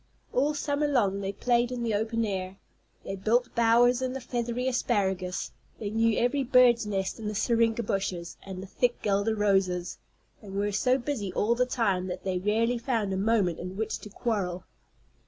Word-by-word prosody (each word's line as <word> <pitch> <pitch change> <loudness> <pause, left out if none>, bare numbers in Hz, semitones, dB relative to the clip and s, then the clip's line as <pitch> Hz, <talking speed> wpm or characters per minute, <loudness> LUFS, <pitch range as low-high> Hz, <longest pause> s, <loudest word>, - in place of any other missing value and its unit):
All 290 +4 +2
summer 290 0 0
long 200 -8 +1
they 195 0 -2
played 240 +4 +1
in 245 -1 -3
the 225 -2 0
open 225 +2 0
air. 190 -2 -4 0.5
They 195 - -4
built 225 +6 +1
bowers 235 +2 +4
in 255 -1 -1
the 265 - -4
feathery 240 0 -2
asparagus; 190 -7 -1 0.3
they 205 -2 -4
knew 225 0 +2
every 255 +4 +1
bird's 245 -3 +5
nest 195 0 -2
in 220 - -5
the 210 - -3
syringa 230 +1 +2
bushes 185 -4 -3
and 190 -1 -7
the - - -7
thick 240 +5 -1
guelder 205 +2 +1
roses, 190 -4 +1 0.4
and 195 -2 -9
were 205 +1 0
so 250 +6 +2
busy 240 -7 -3
all 225 +3 +2
the 250 +1 +1
time 195 -7 0
that 180 0 -5
they 185 -2 -1
rarely 225 +5 +1
found 230 -5 -1
a - - 0
moment 195 -4 +1
in 180 +2 -6
which 220 0 -2
to 210 - -10
quarrel. 200 -5 -2
220 Hz, 185 wpm, -28 LUFS, 195-240 Hz, 0.5 s, bird's